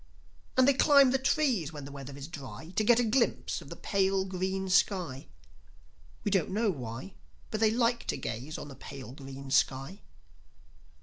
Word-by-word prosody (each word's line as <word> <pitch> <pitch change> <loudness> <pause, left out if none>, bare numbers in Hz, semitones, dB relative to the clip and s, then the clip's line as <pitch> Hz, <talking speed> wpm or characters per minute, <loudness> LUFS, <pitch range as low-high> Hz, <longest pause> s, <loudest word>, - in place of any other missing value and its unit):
And 260 0 +6
they 280 - +6
climb 275 -1 +6
the 265 - +2
trees 260 - +1
when 145 -3 -8
the 140 - -9
weather 140 0 -8
is 140 0 -7
dry 160 +1 -9
To 215 - +2
get 240 +2 +5
a - - +3
glimpse 235 +2 +1
of - - -12
the - - -7
pale 195 -1 +1
green 190 +1 -2
sky. 180 -7 +1 1.0
We 205 - 0
don't 190 -5 +2
know 210 +2 +1
why, 130 - -7 0.4
But 215 - -2
they 220 -1 +5
like 235 +1 +1
to - - -1
gaze 130 +8 -5
on - - -7
the - - -8
pale 130 -2 -9
green 135 0 -9
sky. 135 +9 +1
190 Hz, 180 wpm, -30 LUFS, 140-225 Hz, 1.0 s, And